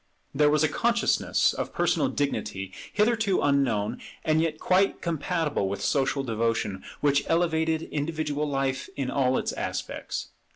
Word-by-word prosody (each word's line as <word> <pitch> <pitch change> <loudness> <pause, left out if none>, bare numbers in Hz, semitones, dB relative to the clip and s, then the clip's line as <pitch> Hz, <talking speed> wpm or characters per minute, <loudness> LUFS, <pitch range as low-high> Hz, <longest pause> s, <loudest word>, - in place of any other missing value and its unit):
There 150 +1 +4
was 150 +1 +3
a - - +5
consciousness 235 +7 +2
of - - -4
personal 275 - +2
dignity 95 - -2 0.2
hitherto 215 -2 +2
unknown, 130 -8 +1 0.2
and 155 0 +3
yet 160 -2 -1
quite 190 +2 +2
compatible 160 - -1
with 100 - -3
social 135 0 +1
devotion, 115 -5 -1 0.2
which 145 -1 +3
elevated 160 -1 +1
individual 150 -1 -2
life 135 -2 -1
in 130 -2 -2
all 130 -2 +2
its - - -2
aspects. - - -4
145 Hz, 135 wpm, -27 LUFS, 135-165 Hz, 0.2 s, a